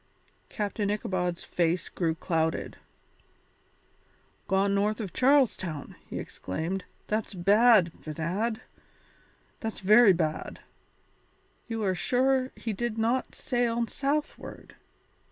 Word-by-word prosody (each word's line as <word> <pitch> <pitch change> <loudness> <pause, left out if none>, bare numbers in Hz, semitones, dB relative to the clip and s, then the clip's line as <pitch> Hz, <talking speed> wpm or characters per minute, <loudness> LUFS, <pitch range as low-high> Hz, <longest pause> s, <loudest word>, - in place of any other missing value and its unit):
Captain 205 -1 -2
Ichabod's 180 -4 -1
face 170 0 0
grew 165 -3 -1
clouded. 160 -1 -1 1.7
"Gone 195 +1 +2
north 210 +2 +1
of 200 -6 -5
Charles 270 -1 +4
Town," 155 -7 -6
he - - -6
exclaimed, 170 - -4 0.2
"that's 215 -1 -2
bad, 205 0 +5
bedad, 180 +9 -2 1.0
that's 225 -2 -5
very 210 +1 +7
bad. 160 -3 -2 1.1
You 225 -2 -3
are 190 -2 +2
sure 260 +6 +1
he 225 - -4
did 235 +2 -3
not 235 +4 0
sail 235 -2 0
southward?" 290 +5 -3
205 Hz, 100 wpm, -28 LUFS, 180-235 Hz, 1.7 s, very